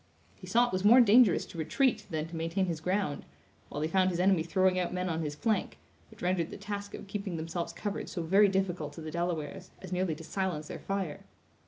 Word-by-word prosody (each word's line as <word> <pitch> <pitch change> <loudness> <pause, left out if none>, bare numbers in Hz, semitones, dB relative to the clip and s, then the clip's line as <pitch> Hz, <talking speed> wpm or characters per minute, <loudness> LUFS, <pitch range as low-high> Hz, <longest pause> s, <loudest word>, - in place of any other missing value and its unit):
He - - -12
saw 240 +1 +4
it 245 - -5
was 185 0 0
more 230 +5 +8
dangerous 230 -3 +6
to 170 - -9
retreat 250 - +1
than 160 -2 -2
to 165 - -9
maintain 165 +4 0
his 170 -3 -3
ground: 180 -4 -1 0.5
while 145 - -4
he - - +1
found 185 +2 +3
his 175 -1 -2
enemy 185 -2 +4
throwing 185 +2 +2
out 180 - -1
men 180 0 -2
on 165 -1 -1
his 150 -2 -3
flank; 215 +4 -1 0.3
which - - -13
rendered 180 -2 +1
the - - -8
task 205 0 -5
of - - -9
keeping 195 -3 -4
themselves 165 +2 -3
covered 205 0 -4
so 170 - -4
very 195 +5 +5
difficult 180 -6 -1
to 165 - -9
the 155 0 -6
Delawares, 170 0 -3
as 185 - -10
nearly 180 -3 0
to 165 - -10
silence 170 -4 -3
their - - -6
fire. 195 -6 -3
180 Hz, 225 wpm, -30 LUFS, 165-195 Hz, 0.5 s, more